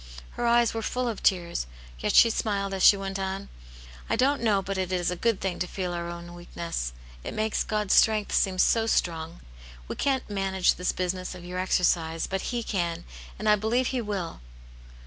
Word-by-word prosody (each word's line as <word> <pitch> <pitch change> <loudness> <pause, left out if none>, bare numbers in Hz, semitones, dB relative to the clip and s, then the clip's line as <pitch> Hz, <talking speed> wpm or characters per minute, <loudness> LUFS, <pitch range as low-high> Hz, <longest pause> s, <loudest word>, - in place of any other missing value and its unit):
Her 240 - -2
eyes 235 0 +4
were 225 - -2
full 250 +2 -2
of 225 -3 -3
tears, 170 - +1 0.3
yet - - 0
she 230 - +8
smiled 200 -3 -1
as 190 - -3
she 200 - +8
went 195 0 -4
on. 190 +1 -4 0.3
" - - -17
I - - +2
don't 275 +4 +2
know 215 -4 +3
but 195 0 -3
it 185 -1 -2
is 180 -1 0
a - - -2
good 225 +3 +1
thing 190 -2 -3
to 180 - -1
feel 180 -1 -3
our 170 0 -4
own 170 0 -8
weakness; 170 - -5 0.3
it - - -6
makes 215 0 0
God's 210 -2 0
strength 215 -2 +4
seem 190 -2 +2
so 225 +4 +3
strong. 165 -5 -1 0.5
We - - -4
can't 270 -2 0
manage 195 -2 +1
this 180 - -1
business 185 0 -3
of 175 -1 -10
your 180 +1 -4
exer 185 0 +1
cise, 165 -1 0
but 195 0 -3
He 240 -1 -2
can, 175 -5 -2 0.3
and 215 - -4
I 210 - +7
believe 230 +5 0
He 255 -2 -1
will." 200 - -4
190 Hz, 205 wpm, -27 LUFS, 175-215 Hz, 0.5 s, she